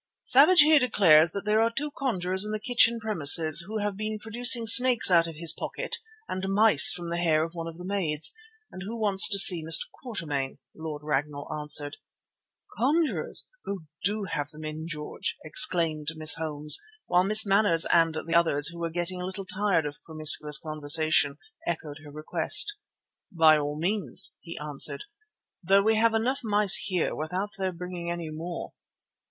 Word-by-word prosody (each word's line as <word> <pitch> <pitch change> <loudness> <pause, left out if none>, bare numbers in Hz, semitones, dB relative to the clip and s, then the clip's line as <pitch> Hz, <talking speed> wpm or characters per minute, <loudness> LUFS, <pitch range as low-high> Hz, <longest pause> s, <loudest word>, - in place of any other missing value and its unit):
"Savage 305 +6 +4
here 305 0 +4
declares 170 - +3
that 200 +2 -7
there 215 +1 0
are 225 - +1
two 290 +6 -6
conjurers 190 -9 -2
in 210 - -4
the 215 - -5
kitchen 235 0 +1
premises, 160 -6 +2
who 220 +1 -6
have 205 -1 -4
been 215 +1 -6
producing 230 +2 +3
snakes 245 -2 +6
out 170 -1 +2
of 165 - -10
his 165 +1 +3
pocket - - -5 0.3
and 185 - -6
mice 215 +2 +6
from 175 -1 -6
the 170 0 -4
hair 160 -2 0
of 165 +1 -8
one 165 -1 -8
of 165 0 -11
the 180 - -11
maids, 170 -6 -1 0.4
and 185 - -11
who 225 +5 -8
want 205 -3 -3
to 195 +3 +6
see 180 -4 +8
Mr. 160 0 +5
Quatermain," 150 - -7 0.2
Lord 155 -2 -9
Ragnall 145 -1 -5
answered. 150 -1 0 0.8
"Conjurers! 300 +6 -2 0.2
Oh, 200 -3 -6 0.2
do 205 +3 -3
have 145 -6 -6
them 155 0 -12
in, 155 +1 -8
George," 150 -2 -7
exclaimed 155 -1 +1
Miss 155 0 +4
Holmes; 150 -2 +1 0.3
while 180 +1 0
Miss 215 +3 +4
Manners 195 -4 +3
and 165 -1 +1
the 165 - -6
others, 165 -4 +2
who 170 0 -12
were 170 0 -4
getting 175 +2 -4
a - - -6
little 190 +1 -9
tired 185 -4 -2
of 145 0 -9
promiscuous 155 -2 +1
conversation, 155 -1 0 0.3
echoed 155 -3 -6
her 150 - -14
request. 155 - 0 0.6
"By 160 -3 +3
all 145 0 -6
means," 195 +6 -3
he 170 -1 -11
answered, 150 - -1 0.6
"though 195 +2 +1
we 220 +1 +1
have 225 0 +1
enough 250 +5 -2
mice 210 -3 -1
here 180 -4 -3
without 180 +7 -6
their 190 -1 -3
bringing 180 0 -9
any 170 -2 -6
more. 165 +3 -9
175 Hz, 175 wpm, -25 LUFS, 155-210 Hz, 0.8 s, see